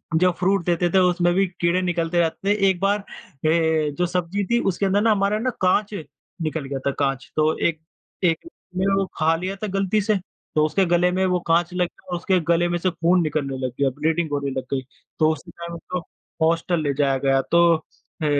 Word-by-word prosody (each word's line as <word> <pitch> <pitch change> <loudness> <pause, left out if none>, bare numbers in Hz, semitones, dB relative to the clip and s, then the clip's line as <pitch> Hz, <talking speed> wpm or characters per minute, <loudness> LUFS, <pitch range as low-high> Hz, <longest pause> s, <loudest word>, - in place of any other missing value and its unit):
जो 180 +2 +4
फ्रूट 190 -1 +1
देते 175 0 +1
थे 190 - +2
उसमें 175 -1 +3
भी 195 +2 +3
कीड़े 175 0 0
निकलते 175 -1 0
रहते 170 +4 0
थे। 200 -1 +3
एक 185 -2 0
बार 200 +1 +2
अ, 200 - -13 0.9
जो 180 - +1
सब्ज़ी 180 +3 -1
थी 235 - +4
उसके 195 +3 -2
अंदर 200 +2 +2
ना 225 - +4
हमारा 205 +1 +1
ना 255 +3 0
काँच 195 +3 +2 0.5
निकल 155 -2 -2
गया 135 0 -4
था, - - +2
काँच 135 -1 -2
तो 155 0 +2
एक, 160 -2 0 0.4
एक 180 - +1 0.3
ने 190 - +1
वो 195 0 +1
खा 160 +1 +3
लिया 185 +4 -3
था - - 0
गलती 195 +2 +1
से 210 -1 +1 0.4
तो 155 - +5
उसके 185 +5 +1
गले 175 +1 +3
में 190 +1 +1
वो 180 -1 +1
काँच 170 +2 +2
लग 180 -1 +1
गया - - -26
और 175 - 0
उसके 185 +2 +1
गले 170 +1 +3
में 175 - 0
से 185 - +1
खून 175 +1 +2
निकलने 145 -3 -2
लग 125 - -2
गया, 140 - +3
ब्लीडिंग 155 +4 -1
होने 140 -1 -1
लग 130 -1 -3
गई, 135 - 0 0.4
तो 155 -1 +4
उसी 165 +3 -11
टाइम 170 0 -8
उसको 180 +2 -5 0.5
हॉस्टल 165 0 +1
ले 145 -2 0
जाया 135 -1 +1
गया। 135 0 +4
तो 170 0 +5 0.6
अ, - - +1
175 Hz, 220 wpm, -23 LUFS, 160-190 Hz, 0.9 s, तो